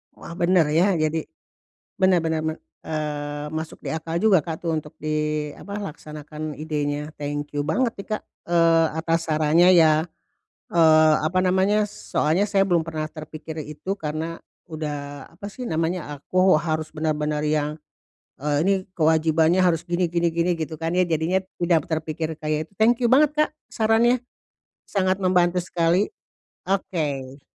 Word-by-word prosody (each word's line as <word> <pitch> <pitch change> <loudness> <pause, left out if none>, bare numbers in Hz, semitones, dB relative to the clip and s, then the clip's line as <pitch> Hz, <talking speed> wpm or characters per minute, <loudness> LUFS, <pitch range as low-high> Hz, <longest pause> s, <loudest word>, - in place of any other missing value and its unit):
Wah, - - -10
bener, 175 -1 +4
ya, 180 +5 +3
jadi 155 0 -1 0.7
bener 185 -2 +4
bener 160 -1 -1
me 160 - 0 0.3
eee, 150 -1 -3
masuk 160 +1 -6
di - - -5
akal 160 +1 -3
juga 215 -3 +5
Kak 160 -1 -5
tuh 170 - -1
untuk 150 -1 -7
di 150 0 -1
apa, 200 +1 -6
laksanakan 150 -3 -7
idenya. 150 -1 -3
Thank 145 0 -4
you 145 - 0
banget 235 - +1
nih, 195 - -8
Kak, 215 - -2 0.2
eee, 165 -1 +4
atas 165 +1 -1
sarannya 160 +3 +4
ya, 160 -2 +5 0.7
eee, 155 -2 +6
apa 155 +4 0
namanya, 190 +3 +3
soalnya 180 0 0
saya 200 -1 +3
belum 175 -4 +2
pernah 155 -1 -3
terpikir 155 0 -8
itu, 150 +5 -6
karena 160 +2 -4 0.3
udah, 145 -2 -5
apa 200 +4 -8
sih 250 +3 -6
namanya, 160 -2 -2
aku 185 +6 +3
harus 155 0 -2
bener-bener 150 -1 -1
yang, 150 -1 +1 0.7
eee, 145 0 0
ini 195 - +3 0.2
kewajibannya 160 +1 +3
harus 175 -3 +2
gini 175 0 0
gini 170 0 +1
gini, 170 +2 +1
gitu 160 -1 -5
kan 165 +1 -1
ya, 185 - +4
jadinya 170 +3 0 0.2
tidak 170 -3 +3
terpikir 160 0 -2
kayak 155 +1 -2
itu. - - -32
Thank 235 +3 +3
you - - +4
banget, 295 +3 +5
Kak, 305 0 +3 0.2
sarannya 230 +3 +2 0.6
sangat 190 -1 0
membantu 180 -1 +3
sekali. 175 +3 +1 0.6
Oke. 145 -8 -2
160 Hz, 150 wpm, -23 LUFS, 155-180 Hz, 0.7 s, eee